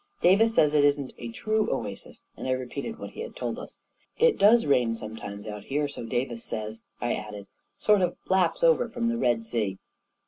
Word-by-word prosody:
" -, -, -42 dB
Davis 220 Hz, +5 st, +5 dB
says 150 Hz, -1 st, +4 dB
it 150 Hz, -1 st, +4 dB
isn't 145 Hz, -2 st, +2 dB
a 120 Hz, -, -5 dB
true 215 Hz, -, 0 dB
oasis," 105 Hz, -7 st, -5 dB
and -, -, -6 dB
I 130 Hz, -, +2 dB
repeated 130 Hz, -, -4 dB
what -, -, -8 dB
he -, -, -8 dB
had 475 Hz, -, -7 dB
told -, -, -3 dB
us. -, -, -10 dB, 0.2 s
" -, -, -40 dB
It 475 Hz, -, +1 dB
does 215 Hz, +2 st, +6 dB
rain 125 Hz, -5 st, +3 dB
sometimes 105 Hz, -2 st, -7 dB
out 105 Hz, -1 st, -7 dB
here, 145 Hz, +2 st, 0 dB
so 140 Hz, -5 st, -7 dB
Davis 120 Hz, 0 st, -2 dB
says,' 110 Hz, 0 st, -4 dB, 0.2 s
9 120 Hz, -, +1 dB
I -, -, +2 dB
added; 105 Hz, -1 st, -6 dB, 0.3 s
"sort 210 Hz, -2 st, +4 dB
of 180 Hz, -1 st, 0 dB
laps 190 Hz, -, +2 dB
over 485 Hz, -, +4 dB
from 235 Hz, 0 st, -1 dB
the 235 Hz, -, -1 dB
Red 120 Hz, -, +1 dB
Sea." 105 Hz, -5 st, -1 dB
135 Hz, 215 wpm, -27 LUFS, -, 0.3 s, does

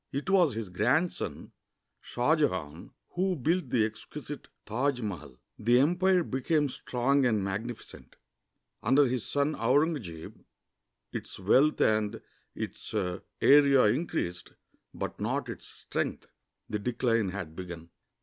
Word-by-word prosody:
It 140 Hz, +7 st, -3 dB
was 175 Hz, -, +4 dB
his 110 Hz, -4 st, -4 dB
grandson, 125 Hz, -, 0 dB, 0.5 s
Shah 125 Hz, +6 st, +1 dB
Jehan, 90 Hz, -, -2 dB, 0.2 s
who 185 Hz, +1 st, 0 dB
built 165 Hz, +1 st, 0 dB
the 115 Hz, -3 st, +3 dB
exquisite 140 Hz, +7 st, -8 dB, 0.2 s
Taj 125 Hz, +4 st, 0 dB
Mahal. 80 Hz, -, -6 dB, 0.2 s
The 120 Hz, +3 st, +4 dB
empire 180 Hz, +5 st, +3 dB
became 145 Hz, +2 st, 0 dB
strong 130 Hz, +2 st, 0 dB
and 110 Hz, -5 st, +2 dB
magnificent. 100 Hz, -, -6 dB, 0.7 s
Under 135 Hz, +6 st, +4 dB
his 125 Hz, -3 st, -1 dB
son 145 Hz, +2 st, +1 dB
Aurungzebe 125 Hz, -, -1 dB, 0.7 s
its -, -, -6 dB
wealth 130 Hz, +11 st, +3 dB
and 110 Hz, -1 st, +2 dB, 0.4 s
its -, -, -6 dB, 0.5 s
area 140 Hz, -2 st, +6 dB
increased, 105 Hz, -, -1 dB, 0.4 s
but -, -, -5 dB
not -, -, -2 dB
its -, -, -7 dB
strength. -, -, -4 dB, 0.4 s
The 105 Hz, -, -2 dB
decline 115 Hz, -2 st, 0 dB
had 90 Hz, -4 st, -6 dB
begim. 85 Hz, -2 st, -8 dB
125 Hz, 120 wpm, -29 LUFS, 105-145 Hz, 0.7 s, area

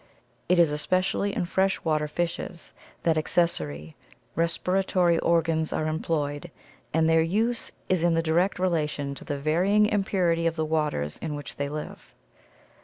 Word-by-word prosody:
It 180 Hz, -, +4 dB
is 170 Hz, -3 st, +5 dB
especially 185 Hz, +6 st, 0 dB
in -, -, 0 dB
fresh 190 Hz, +2 st, 0 dB
water 155 Hz, -2 st, +1 dB
fishes 170 Hz, +1 st, -4 dB, 0.3 s
that 160 Hz, -2 st, +3 dB
accessory 80 Hz, -, -1 dB, 0.4 s
respiratory 175 Hz, +1 st, +1 dB
organs 165 Hz, -1 st, +1 dB
are 155 Hz, -, -1 dB
employed 155 Hz, 0 st, -2 dB, 0.4 s
and 160 Hz, 0 st, +2 dB
their 165 Hz, 0 st, +4 dB
use 220 Hz, +8 st, 0 dB, 0.2 s
is 185 Hz, -3 st, +1 dB
in 170 Hz, -1 st, +3 dB
direct 165 Hz, +4 st, +1 dB
relation 150 Hz, -6 st, -1 dB
to -, -, -9 dB
the 145 Hz, -, -3 dB
varying 180 Hz, +9 st, +3 dB
impurity 185 Hz, -5 st, +1 dB
of 165 Hz, -, -1 dB
the 160 Hz, -1 st, -1 dB
waters 150 Hz, -, -1 dB
in 155 Hz, -2 st, -4 dB
which 145 Hz, -4 st, -8 dB
they 140 Hz, 0 st, -2 dB
live. 150 Hz, +1 st, -8 dB
165 Hz, 145 wpm, -26 LUFS, 150-180 Hz, 0.4 s, is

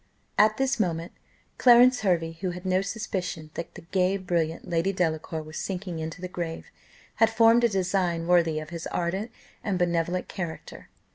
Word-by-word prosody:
At 215 Hz, +1 st, +4 dB
this 270 Hz, -1 st, 0 dB
moment 170 Hz, -4 st, -1 dB, 0.5 s
Clarence 245 Hz, 0 st, +7 dB
Hervey, 170 Hz, -5 st, +1 dB
who 185 Hz, -, -1 dB
had 180 Hz, +1 st, -7 dB
no 185 Hz, 0 st, +2 dB
suspicion 185 Hz, -6 st, -4 dB
that 170 Hz, -, -7 dB
the -, -, -9 dB
gay, 185 Hz, +2 st, +1 dB
brilliant 170 Hz, -4 st, -2 dB
Lady 170 Hz, +3 st, +1 dB
Delacour 160 Hz, -3 st, -2 dB
was 155 Hz, +1 st, -9 dB
sinking 185 Hz, -3 st, -4 dB
into 160 Hz, +2 st, -6 dB
the 185 Hz, -, -3 dB
grave, 170 Hz, -2 st, -5 dB, 0.5 s
had 225 Hz, -, +5 dB
formed 230 Hz, +1 st, +5 dB
a 235 Hz, -, +5 dB
design 180 Hz, -3 st, 0 dB
worthy 170 Hz, -3 st, +3 dB
of 155 Hz, +1 st, -9 dB
his 170 Hz, -1 st, -5 dB
ardent 190 Hz, +6 st, -2 dB, 0.3 s
and 200 Hz, -3 st, -1 dB
benevolent 175 Hz, 0 st, 0 dB
character. 170 Hz, -4 st, -7 dB
180 Hz, 165 wpm, -26 LUFS, 165-195 Hz, 0.5 s, Clarence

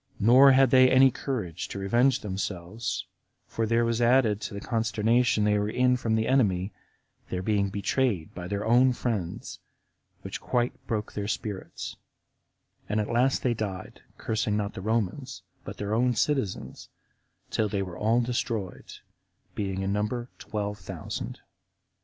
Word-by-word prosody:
Nor 130 Hz, +6 st, +7 dB
had 135 Hz, -1 st, +5 dB
they 130 Hz, -1 st, +7 dB
any 130 Hz, 0 st, +6 dB
courage 110 Hz, -, -4 dB
to -, -, -7 dB
revenge 120 Hz, +7 st, +2 dB
themselves; 95 Hz, +1 st, -4 dB, 0.4 s
for 115 Hz, -1 st, -2 dB
there 115 Hz, +1 st, +2 dB
was 115 Hz, 0 st, 0 dB
added 115 Hz, -4 st, +3 dB
to 105 Hz, -, -5 dB
the -, -, -4 dB
consternation 115 Hz, 0 st, +1 dB
they 105 Hz, 0 st, +3 dB
were 105 Hz, 0 st, -1 dB
in 125 Hz, +2 st, +3 dB
from 115 Hz, -3 st, 0 dB
the 110 Hz, 0 st, 0 dB
enemy, 105 Hz, -7 st, +2 dB, 0.6 s
their 90 Hz, 0 st, -3 dB
being 100 Hz, -1 st, +1 dB
betrayed 100 Hz, -2 st, -1 dB
by 90 Hz, 0 st, -6 dB
their 100 Hz, +2 st, -3 dB
own 125 Hz, +3 st, +5 dB
friends, 105 Hz, -9 st, -3 dB, 0.6 s
which -, -, -6 dB
quite 120 Hz, 0 st, 0 dB
broke 105 Hz, -2 st, -2 dB
their 100 Hz, -1 st, -3 dB
spirits; 105 Hz, -2 st, -5 dB, 0.9 s
and 105 Hz, +1 st, +1 dB
at 105 Hz, +2 st, -2 dB
last 125 Hz, +3 st, +2 dB
they 125 Hz, -, +2 dB
died, 100 Hz, -5 st, -5 dB, 0.2 s
cursing 110 Hz, -1 st, -1 dB
not 100 Hz, -1 st, -2 dB
the 95 Hz, -, -7 dB
Romans, 115 Hz, +5 st, -2 dB, 0.2 s
but -, -, -8 dB
their 105 Hz, +1 st, -3 dB
own 125 Hz, +2 st, +2 dB
citizens, 130 Hz, -5 st, -2 dB, 0.6 s
till 110 Hz, -1 st, +1 dB
they 100 Hz, -1 st, -1 dB
were 90 Hz, -3 st, -7 dB
all 110 Hz, +5 st, +2 dB
destroyed, 115 Hz, -5 st, -3 dB, 0.6 s
being 95 Hz, -2 st, -2 dB
in 95 Hz, +1 st, -1 dB
number 120 Hz, +4 st, -2 dB
twelve 105 Hz, -1 st, -4 dB
thousand. -, -, -6 dB
110 Hz, 150 wpm, -27 LUFS, 100-120 Hz, 0.9 s, Nor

